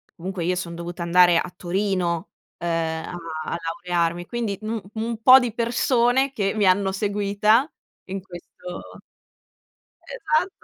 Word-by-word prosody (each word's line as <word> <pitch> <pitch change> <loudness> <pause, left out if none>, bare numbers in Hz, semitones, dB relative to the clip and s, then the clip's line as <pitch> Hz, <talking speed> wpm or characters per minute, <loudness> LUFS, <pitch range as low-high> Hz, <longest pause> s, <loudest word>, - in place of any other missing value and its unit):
comunque 180 0 -5
io 180 +1 +1
son 170 -1 -4
dovuta 170 +1 -6
andare 175 0 +5
a 175 - -2
Torino, 180 -2 -1 0.3
uhm, 175 - -5
a 165 0 -2 0.5
laurearmi, 175 0 -1
quindi 225 -4 -3
un 220 0 -3
un 225 0 -3
po' 255 +2 +9
di 245 -4 0
persone 245 +2 +2
che 195 -1 0
mi 210 -2 +2
hanno 190 +1 +3
seguita 205 +6 +1 0.3
in 195 0 -5
questo 180 -1 -10 1.1
Esatto, 370 -7 -1
195 Hz, 130 wpm, -23 LUFS, 175-225 Hz, 1.1 s, po